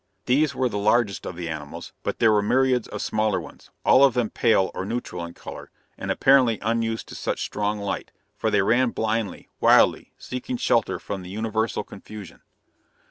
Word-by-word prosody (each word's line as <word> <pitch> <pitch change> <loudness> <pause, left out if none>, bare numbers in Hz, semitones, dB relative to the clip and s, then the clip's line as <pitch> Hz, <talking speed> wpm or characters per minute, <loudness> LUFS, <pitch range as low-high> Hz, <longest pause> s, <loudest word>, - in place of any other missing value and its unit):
These 140 +2 +2
were 130 - +1
the 105 -4 -3
largest 105 0 +1
of 90 - -6
the 85 -1 -5
animals, 75 -2 -7
but - - -3
there 110 -2 +4
were 105 -1 +3
myriads 130 +2 +2
of - - -5
smaller 110 -2 0
ones, - - -12 0.2
all 135 - +6
of 135 -4 +5
them 120 -3 0
pale 110 -5 +2
or - - -4
neutral 100 -5 -4
in 85 0 -8
color, - - -9 0.3
and - - -6
apparently 130 -5 +4
unused 115 0 -1
to - - -9
such - - -2
strong 105 +1 -2
light, 100 -1 -4 0.2
for - - -1
they 100 -2 +3
ran 120 +4 +3
blindly, 110 -2 -2
wildly - - +4
seeking 125 0 -5
shelter 115 -2 +1
from 100 -2 -6
the 90 - -9
universal 110 +2 -1
confusion. 105 -4 -11
110 Hz, 185 wpm, -24 LUFS, 100-120 Hz, 0.3 s, all